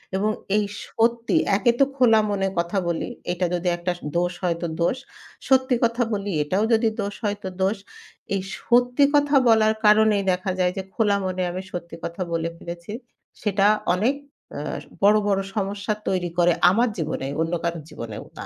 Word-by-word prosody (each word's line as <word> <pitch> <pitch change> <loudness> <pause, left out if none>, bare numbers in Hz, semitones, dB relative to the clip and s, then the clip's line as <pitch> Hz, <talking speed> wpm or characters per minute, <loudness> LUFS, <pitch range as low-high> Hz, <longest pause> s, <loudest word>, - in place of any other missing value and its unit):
এবং 210 +3 +1 0.3
এই 210 - +2 0.2
সত্যি 235 +4 0 0.2
একে 220 +4 +3
তো 275 - +6
খোলা 240 -5 +5
মনে 195 -1 0
কথা 170 +4 -1
বলি 170 -1 -2 0.2
এটা 180 +1 -1
যদি 180 0 -2
একটা 175 +1 -2 0.3
দোষ 175 +1 0
হয় 170 -2 +1
তো 170 - -1
দোষ। 210 +9 +1 0.5
সত্যি 260 -1 +4
কথা 235 +1 +2
বলি 200 -1 -2
এটাও 185 +8 0
যদি 225 0 +3
দোষ 200 0 -3
হয় 205 -1 -1
তো 190 - -3
দোষ। 195 +3 +1 0.6
এই 195 - 0 0.2
সত্যি 245 +3 +3
কথা 290 0 +3
বলার 220 -1 +5
কারণেই 210 -1 +5
দেখা 185 +2 -1
যায় 180 -1 +2
যে 190 - -2
খোলা 210 -3 +2
মনে 185 0 -2
আমি 185 +2 -4
সত্যি 170 -1 -6
কথা 170 +2 -5
বলে 165 0 -1
ফেলেছি। 170 +3 -8 0.5
সেটা 205 -1 +2 0.3
অনেক 225 +9 +1 0.4
আ - - -4 0.4
বড়, 205 +1 +6
বড় 195 -1 +2
সমস্যা 200 +1 -1
তৈরি 180 -2 0
করে 175 0 +4 0.2
আমার 230 +6 +2
জীবনে, 155 -4 -3
অন্য 165 +1 -1
কারোর 170 -2 -2
জীবনেও 110 -2 -7
না। - - -6
200 Hz, 175 wpm, -23 LUFS, 175-220 Hz, 0.6 s, তো